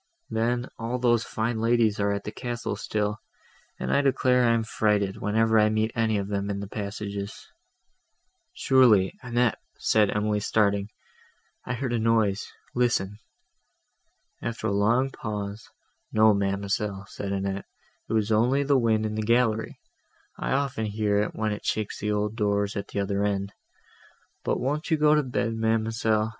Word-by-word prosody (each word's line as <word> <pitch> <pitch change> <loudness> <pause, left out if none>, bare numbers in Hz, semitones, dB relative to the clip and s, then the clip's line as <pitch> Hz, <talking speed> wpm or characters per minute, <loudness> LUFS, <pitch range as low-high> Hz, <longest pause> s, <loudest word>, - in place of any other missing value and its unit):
Then, 120 +2 0
all 115 +2 -2
those 120 -2 +2
fine 110 +1 -2
ladies 115 -2 +2
are 100 0 +1
at 100 0 -2
the 105 - -5
castle 120 +1 -4
still; 105 0 -2 0.6
and - - -1
I 140 - +4
declare 130 -2 +3
I 115 - +4
am 115 - 0
frighted, 105 -3 0
whenever 110 +1 +3
I 105 0 +4
meet 110 +1 0
any 110 -2 +1
of 100 -1 -2
them 100 0 -2
in 100 -1 -2
the 100 - -5
passages—" 100 -1 -5 1.1
"Surely, 115 -8 +4
Annette," 120 -2 +1 0.2
said 105 -2 +3
Emily 105 0 0
starting, 100 -1 +1 0.8
"I 125 - -1
heard 125 -1 -2
a 120 - +1
noise: 110 -2 +1 0.2
listen." 110 -5 0 1.2
After 115 -1 -4
a 110 - +1
long 115 +7 +2
pause, 105 -2 -5 0.4
"No, 110 0 +5
ma'amselle," 100 0 -1
said 100 -1 -5
Annette, 100 0 -2 0.4
"it - - -2
was 110 -1 +1
only 125 +6 +3
the 140 -1 +3
wind 110 -2 +2
in 110 - -2
the 110 - -2
gallery; 115 0 +1 0.6
I - - -2
often 135 -5 -1
hear 105 -1 +1
it, 105 - -3
when 110 -1 -1
it 105 - -5
shakes 110 -1 -2
the 105 +1 -1
old 105 +1 -1
doors, 100 -2 0
at 100 - -4
the - - -4
other 100 0 0
end. 100 -1 -1 0.9
But - - 0
won't 145 +6 -2
you 160 - +3
go 150 0 +5
to 150 - +4
bed, 120 -3 -1
ma'amselle? 110 -1 +1
110 Hz, 165 wpm, -26 LUFS, 100-115 Hz, 1.2 s, No